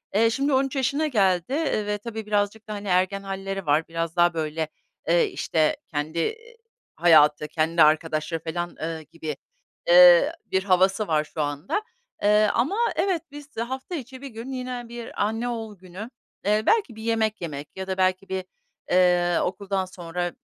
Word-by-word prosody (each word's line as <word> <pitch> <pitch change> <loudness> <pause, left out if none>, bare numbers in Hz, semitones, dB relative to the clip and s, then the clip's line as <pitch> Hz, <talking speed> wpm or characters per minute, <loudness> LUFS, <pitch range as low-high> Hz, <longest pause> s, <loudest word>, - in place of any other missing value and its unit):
Eee, 225 +2 +5
şimdi 275 +5 0
13 270 +1 +1
yaşına 280 +4 +1
geldi, 190 - +2
eee, 290 -8 0
ve 210 0 -1
tabii 220 0 -6
birazcık 210 +1 -1
da, - - -3
hani, 205 0 -6
ergen 185 +2 +1
halleri 195 0 -4
var. 150 +2 +2
Biraz 165 0 -3
daha, 175 0 +4
böyle, 160 0 -2 0.4
ııı, 170 0 +5
işte, 155 - 0
kendi 160 - -2 0.6
hayatı, 150 -3 +5
kendi 160 +2 +1
arkadaşları 155 +1 +1
felan, 175 +1 -4
ııı, 160 0 -3
gibi, 155 -1 -6 0.5
ııı, - - +8
bir 190 0 0
havası 195 +2 +2
var 155 -2 +2
şu 155 +1 -5
anda. 145 - -2 0.4
Eee, 210 +1 +5
ama, 300 +11 +1 0.2
evet, 370 -5 +1
biz, 290 0 -12
eee, 230 - 0
hafta 265 +8 -5
içi 260 -3 -8
bir 280 - -6
gün 235 +1 -8
yine 250 -2 -4
bir 235 -3 -4
anne 225 +3 -2
oğul 225 -3 -5
günü, 185 +5 -9 0.4
eee, 210 +1 +2
belki 410 - +2
bir 220 - -9
yemek 220 -2 0
yemek 150 -4 -6
ya 190 0 -5
da 190 -1 -3
belki 185 +1 +1
bir, 190 -1 -3 0.5
ııı, 180 -1 +3
okuldan 195 0 -2
sonra 175 -1 -4
195 Hz, 170 wpm, -25 LUFS, 170-230 Hz, 0.6 s, ııı